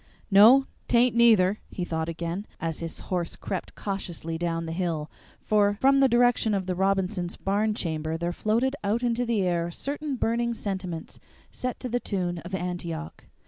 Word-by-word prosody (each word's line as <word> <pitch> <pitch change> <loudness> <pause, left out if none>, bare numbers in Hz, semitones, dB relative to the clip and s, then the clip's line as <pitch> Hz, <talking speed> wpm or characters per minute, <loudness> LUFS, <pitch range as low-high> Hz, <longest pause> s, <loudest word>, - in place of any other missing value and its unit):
"No, 230 +8 +8 0.2
't 240 - +3
aint, 240 0 +4
neither," 215 -4 +5
he 180 - -4
thought 160 -1 -2
again, 170 +4 -4
as 165 -2 -3
his 165 -1 -5
horse 175 -2 -1
crept 190 - -5
cautiously 175 -5 -4
down 165 0 -2
the 165 - -4
hill, 165 -3 -2 0.3
for 205 -1 +2
from 275 +1 +5
the 270 -1 +5
direction 240 -3 +3
of 190 -2 -1
the 185 - -1
Robinsons' 190 -1 0
barn 210 +2 0
chamber 160 -3 -2
there 170 +1 -2
floated 235 +8 +1
out 215 +4 0
into 240 0 0
the 220 -4 +1
air 170 -2 0
certain 285 - -3
burning 235 0 0
sentiments 185 -6 -5 0.3
set 250 0 -4
to 255 - -3
the 245 0 0
tune 180 -6 -2
of 175 +3 -5
"Antioch." 175 -2 -5
195 Hz, 175 wpm, -26 LUFS, 170-230 Hz, 0.3 s, No